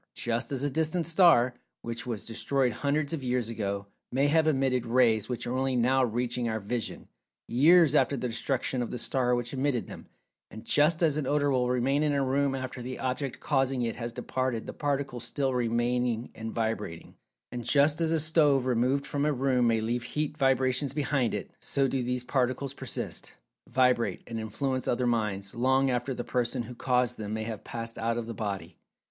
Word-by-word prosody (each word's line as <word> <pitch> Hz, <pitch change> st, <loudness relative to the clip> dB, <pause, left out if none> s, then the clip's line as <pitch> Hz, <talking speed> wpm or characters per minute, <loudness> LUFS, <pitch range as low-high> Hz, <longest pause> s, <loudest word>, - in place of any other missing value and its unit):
Just 120 Hz, +1 st, -2 dB
as 135 Hz, -1 st, -1 dB
a 145 Hz, -, +1 dB
distant 160 Hz, +3 st, 0 dB
star, 165 Hz, -8 st, +5 dB, 0.3 s
which 115 Hz, +1 st, -5 dB
was 115 Hz, -5 st, -4 dB
destroyed 125 Hz, +2 st, 0 dB
hundreds 145 Hz, +4 st, 0 dB
of 150 Hz, -5 st, -3 dB
years 125 Hz, -2 st, 0 dB
ago, 100 Hz, -3 st, -3 dB, 0.3 s
may 135 Hz, +3 st, +2 dB
have 160 Hz, +1 st, +3 dB
emitted 135 Hz, -4 st, +1 dB
rays 115 Hz, -3 st, +3 dB
which 125 Hz, -, -3 dB
are 125 Hz, -, -2 dB
only 130 Hz, 0 st, 0 dB
now 130 Hz, +2 st, +3 dB
reaching 120 Hz, 0 st, -1 dB
our 110 Hz, 0 st, -1 dB
vision, 110 Hz, +3 st, -4 dB, 0.4 s
years 155 Hz, +4 st, +5 dB
after 140 Hz, -1 st, +3 dB
the 125 Hz, -, -2 dB
destruction 125 Hz, +2 st, -1 dB
of 120 Hz, -, -3 dB
the -, -, -4 dB
star 125 Hz, 0 st, +1 dB
which 120 Hz, +1 st, -3 dB
emitted 130 Hz, -6 st, 0 dB
them—and 110 Hz, +2 st, -14 dB
just 155 Hz, +6 st, +3 dB
as 155 Hz, -3 st, +3 dB
an 145 Hz, -4 st, -2 dB
odor 145 Hz, -1 st, +2 dB
will 125 Hz, -2 st, +1 dB
remain 130 Hz, +3 st, +1 dB
in 150 Hz, -1 st, +2 dB
a 140 Hz, -1 st, +1 dB
room 135 Hz, +1 st, +1 dB
after 130 Hz, -1 st, -5 dB
the 125 Hz, +1 st, -5 dB
object 130 Hz, +1 st, -3 dB
causing 135 Hz, -3 st, +1 dB
it 115 Hz, -1 st, -2 dB
has 120 Hz, 0 st, -4 dB
departed 130 Hz, -1 st, -2 dB
the -, -, -6 dB
particles 140 Hz, -4 st, -2 dB
still 135 Hz, -2 st, -1 dB
remaining 120 Hz, 0 st, 0 dB
and 110 Hz, 0 st, -6 dB
vibrating—and 110 Hz, +2 st, -5 dB
just 145 Hz, +6 st, +3 dB
as 160 Hz, -1 st, +2 dB
a 165 Hz, -, +2 dB
stove 150 Hz, -4 st, +3 dB
removed 130 Hz, +3 st, +1 dB
from 145 Hz, 0 st, -2 dB
a 150 Hz, -, +2 dB
room 130 Hz, -3 st, +2 dB
may 115 Hz, -1 st, +2 dB
leave 120 Hz, +2 st, -1 dB
heat 150 Hz, +4 st, -3 dB
vibrations 135 Hz, -1 st, +1 dB
behind 140 Hz, -4 st, 0 dB
it—so 135 Hz, -1 st, -2 dB
do 130 Hz, 0 st, -1 dB
these 125 Hz, 0 st, -2 dB
particles 130 Hz, +1 st, -1 dB
persist, 130 Hz, -3 st, -5 dB, 0.3 s
vibrate, 125 Hz, -2 st, +2 dB
and 115 Hz, -1 st, -5 dB
influence 130 Hz, +4 st, -2 dB
other 125 Hz, +1 st, +1 dB
minds, 105 Hz, -4 st, -1 dB
long 130 Hz, +2 st, +2 dB
after 125 Hz, +2 st, -1 dB
the 120 Hz, -, -4 dB
person 120 Hz, 0 st, -1 dB
who 115 Hz, -, -8 dB
caused 125 Hz, 0 st, 0 dB
them 105 Hz, 0 st, -3 dB
may 110 Hz, -, -3 dB
have 110 Hz, -2 st, -6 dB
passed 115 Hz, -1 st, -6 dB
out 115 Hz, +1 st, 0 dB
of 120 Hz, -, -3 dB
the 115 Hz, -, -5 dB
body. 100 Hz, -3 st, -5 dB
125 Hz, 190 wpm, -28 LUFS, 120-140 Hz, 0.4 s, star